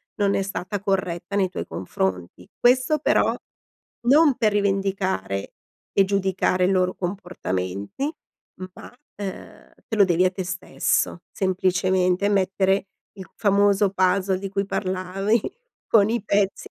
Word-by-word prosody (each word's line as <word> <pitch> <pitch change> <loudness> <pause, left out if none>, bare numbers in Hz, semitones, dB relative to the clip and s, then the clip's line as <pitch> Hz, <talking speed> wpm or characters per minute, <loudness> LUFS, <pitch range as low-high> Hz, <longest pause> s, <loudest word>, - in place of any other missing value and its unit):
non 200 -1 +1
è - - +1
stata 195 +1 -4
corretta 185 -1 -2
nei 190 -2 +2
tuoi - - -5
confronti. 90 -1 -4
Questo 255 +5 +3
però - - +2 0.7
non 290 0 +6
per 215 -2 +2
rivendicare 195 - -1 0.4
e 195 - +4
giudicare 190 -2 +1
i 190 - +2
loro 185 -1 +1
comportamenti, 175 - -4 0.6
ma, - - -11 0.3
uhm, 195 -2 -8
te 220 - -3
lo 205 - +6
devi 180 0 +2
a 185 - +2
te 185 0 -4
stesso. 180 -1 -1
Semplicemente 185 0 +1
mettere 195 0 +1 0.3
il 190 -3 -11
famoso 200 -1 +3
puzzle 190 0 +1
di 195 0 -5
cui 195 0 -1
parlavi 195 +3 -1 0.5
con 215 -1 +4
i 235 -1 0
pezzi 200 -2 0
190 Hz, 130 wpm, -23 LUFS, 185-200 Hz, 0.7 s, non